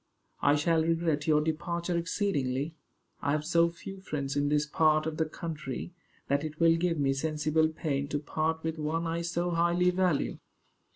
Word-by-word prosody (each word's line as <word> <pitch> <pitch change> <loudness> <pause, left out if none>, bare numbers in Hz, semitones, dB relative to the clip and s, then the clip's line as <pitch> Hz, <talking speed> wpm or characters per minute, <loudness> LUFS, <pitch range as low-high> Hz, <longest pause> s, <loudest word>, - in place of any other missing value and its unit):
"I 145 +1 +4
shall 160 +2 +2
regret 165 -2 0
your 150 -1 +4
departure 170 +3 -2
exceedingly. 165 -5 -1 0.5
I 140 - +1
have 150 0 -1
so 170 0 +4
few 190 +3 -9
friends 140 -6 -3
in 145 0 +1
this 150 0 +2
part 155 0 +3
of 160 -1 -3
the 160 - +1
country, 155 -1 -6 0.3
that 140 +1 +1
it 155 0 -6
will 165 -1 +5
give 165 0 0
me 135 -2 +2
sensible 155 +2 +1
pain 145 -3 -2
to 145 - -1
part 160 +2 -2
with 160 0 -3
one 160 +2 -1
I 165 +1 -1
so 175 +1 -1
highly 175 +1 +3
value." 180 -5 0
160 Hz, 175 wpm, -29 LUFS, 150-170 Hz, 0.5 s, will